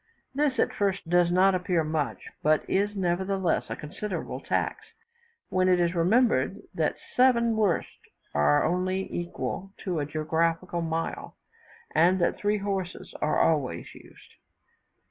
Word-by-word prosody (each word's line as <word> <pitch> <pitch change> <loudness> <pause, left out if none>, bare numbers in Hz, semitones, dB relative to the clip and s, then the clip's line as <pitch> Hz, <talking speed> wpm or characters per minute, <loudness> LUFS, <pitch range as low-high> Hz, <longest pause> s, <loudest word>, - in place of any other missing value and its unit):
This 280 -2 +1
at - - +1
first 195 -2 -1
does 175 -1 +4
not 190 +2 +4
appear 180 -2 +1
much; 155 -6 -3
but 155 0 +2
is, 205 +2 0
nevertheless, 190 0 0
a - - -3
considerable 190 +7 -5
tax, - - -2 0.7
when 185 0 +2
it 180 -1 +4
is 170 0 +2
remembered 220 +8 +2
that - - 0 0.2
seven 235 -3 +4
wersts 210 -5 -1 0.2
are 75 0 +3
only 185 +2 0
equal 180 +2 -4
to 180 -5 -1
a 145 - -2
geographical 165 +3 -1
mile, 165 0 -3 0.6
and 175 +4 +4
that 175 - +1
three 210 +1 +1
horses 195 -3 -4
are 150 - +1
always 150 -5 0
used. - - -17
180 Hz, 135 wpm, -27 LUFS, 165-195 Hz, 0.7 s, does